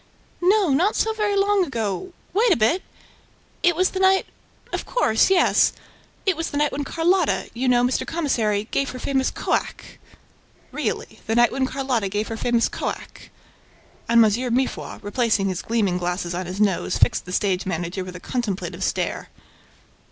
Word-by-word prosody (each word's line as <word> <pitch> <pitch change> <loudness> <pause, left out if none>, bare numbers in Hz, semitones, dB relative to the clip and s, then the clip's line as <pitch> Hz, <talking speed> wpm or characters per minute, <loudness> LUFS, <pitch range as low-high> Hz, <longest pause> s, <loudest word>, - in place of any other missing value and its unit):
"No, 385 0 +3
not 345 +10 +2
so 445 - +1
very 420 -2 0
long 400 0 +3
ago... 235 - -3 0.2
Wait 435 +3 +3
a - - +6
bit!... 235 - +2 0.8
It 350 -1 +3
was 370 +2 +2
the 380 - -3
night... 380 0 +4 0.5
of - - -2
course, 225 - +2
yes... 380 -2 +4 0.5
It 385 -3 +2
was 330 +1 -3
the 285 - -4
night 295 0 +2
when 290 - -3
Carlotta 335 +4 +1
you 255 +2 -2
know, 245 -1 +4
Mr. 250 +1 0
Commissary 220 -10 0
gave 275 - 0
her 255 - -7
famous 265 +1 0
'co - - -3
ack'!" - - -3 0.7
"Really? - - -4
The 225 - 0
night 240 0 +5
when 265 0 0
Carlotta 260 -7 -1
gave 210 +2 -2
her 225 - -4
famous 235 0 +2
'co - - -3
ack'?" - - -9 0.8
And 230 -1 +6
M. 235 +3 0
Mifroid, 260 0 -2
replacing 210 -2 +1
his 185 -2 -3
gleaming 205 -6 0
glasses 175 0 -2
on 180 0 -4
his 185 +2 -6
nose, 200 -4 +1
fixed - - +2
the 180 - -8
stage 190 -1 0
manager 175 +1 -3
with 185 0 -9
a - - -7
contemplative 190 -5 -3
stare. - - -2
245 Hz, 175 wpm, -23 LUFS, 200-335 Hz, 0.8 s, a